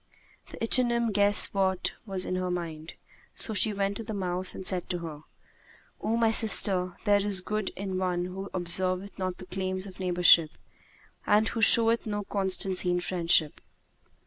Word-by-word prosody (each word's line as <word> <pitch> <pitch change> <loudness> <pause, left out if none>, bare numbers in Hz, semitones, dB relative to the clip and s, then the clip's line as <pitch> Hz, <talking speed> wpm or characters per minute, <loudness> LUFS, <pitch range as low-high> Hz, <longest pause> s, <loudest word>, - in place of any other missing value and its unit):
The - - -11
ichneumon 235 -1 +3
guess 205 0 +5
what 190 -2 -1 0.2
was 190 -2 -3
in - - -4
her 185 0 -3
mind, 165 -3 -6 0.4
so 220 - +1
she 215 +1 +3
went 200 0 -2
to 230 - -6
the 220 -1 -6
mouse 185 -1 -2
and 190 - -8
said 180 -2 -2
to 180 - -2
her, 160 -3 -8 0.8
"O 225 +2 -1
my 225 -1 +2
sister, 190 -5 +1
there 205 -1 +3
is 200 -3 +1
no - - -25
good 215 -2 -3
in 190 -1 -5
one 180 -1 -2
who 190 +2 -7
observeth 185 +2 -2
not 185 -1 -3
the 185 - -10
claims 185 +1 -4
of 190 -1 -12
neighborship 175 -3 +4 0.8
and 215 +1 +3
who 225 - -4
showeth 230 +1 +5
no 205 -1 -3
constancy 190 -2 -2
in 175 0 0
friendship." 170 -4 +1
190 Hz, 170 wpm, -27 LUFS, 180-205 Hz, 0.8 s, guess